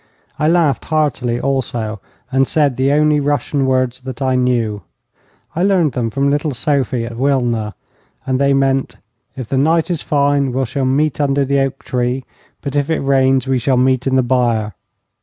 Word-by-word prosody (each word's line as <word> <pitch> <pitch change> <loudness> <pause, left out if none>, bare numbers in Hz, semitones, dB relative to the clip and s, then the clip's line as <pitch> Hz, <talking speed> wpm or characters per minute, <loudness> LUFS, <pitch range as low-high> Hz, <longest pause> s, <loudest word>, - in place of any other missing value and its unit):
I 150 - +2
laughed 165 -4 +2
heartily 140 -6 0
also, 120 -5 -2 0.3
and 135 0 +2
said 145 -4 +1
the 130 +2 +1
only 150 0 +3
Russian 145 -1 0
words 130 -1 0
that 130 0 -8
I 130 -1 0
knew. 120 -5 0 0.7
I 170 - -1
learned 185 -6 +2
them 120 -2 -2
from 140 +4 0
little 145 -1 -1
Sophie, 130 -3 0
at 115 0 -8
Wilna, 120 -5 0 0.5
and 130 0 0
they 140 0 +3
meant: 135 -1 +1 0.4
'If 130 -4 -6
the 135 - +1
night 165 +4 +2
is 170 - -2
fine 140 -2 +1
we 130 +1 0
shall 130 +2 -2
meet 145 +3 +1
under 140 -1 +1
the 140 +1 +1
oak 135 -1 -2
tree, 125 +1 -2 0.4
but 140 0 -5
if 145 +1 0
it 160 - +1
rains 135 -1 +2
we 130 -1 +1
shall 130 +2 +1
meet 130 0 +2
in 130 - +1
the 130 - +3
byre.' 120 -4 0
135 Hz, 180 wpm, -17 LUFS, 125-145 Hz, 0.7 s, only